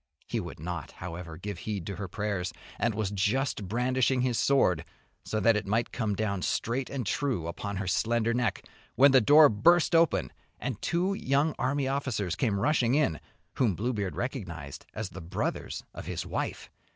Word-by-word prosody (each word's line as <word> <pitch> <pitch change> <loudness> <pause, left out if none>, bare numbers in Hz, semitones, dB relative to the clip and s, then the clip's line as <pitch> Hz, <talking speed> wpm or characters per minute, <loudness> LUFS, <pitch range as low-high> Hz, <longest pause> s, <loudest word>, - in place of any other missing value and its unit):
He - - -1
would - - -7
not, 85 +1 -5
however, 85 -1 -7
give 100 -1 -6
heed 100 -4 -4
to 100 - -5
her 100 - -4
prayers, 100 -1 -2 0.3
and 115 -2 +1
was 105 -2 -1
just 105 +1 0
brandishing 125 +3 +1
his 125 -2 +1
sword, 90 - +3 0.4
so 110 - -2
that 115 +2 +4
it 105 -1 -2
might 115 +4 0
come 110 -4 -1
down 100 -2 -1
straight 125 +7 -1
and 130 -4 -3
true 125 - -1
upon 100 +4 -4
her 95 - -2
slender 115 +4 +1
neck, 120 -1 -1 0.3
when 140 +3 +7
the 130 -1 +6
door 150 +7 +8
burst 165 +12 +4
open 165 -1 +3 0.3
and 120 -6 -4
two 180 +3 +1
young 145 -2 +1
army 135 +1 0
officers 130 -9 -1
came 105 -5 0
rushing 130 0 +2
in, 135 - +2 0.4
whom 115 -8 +2
Bluebeard 105 -3 -2
recognised 90 - -5
as 110 -3 -3
the 95 - -8
brothers 80 - -3
of - - -8
his - - -3
wife. - - -4
110 Hz, 175 wpm, -29 LUFS, 95-130 Hz, 0.4 s, door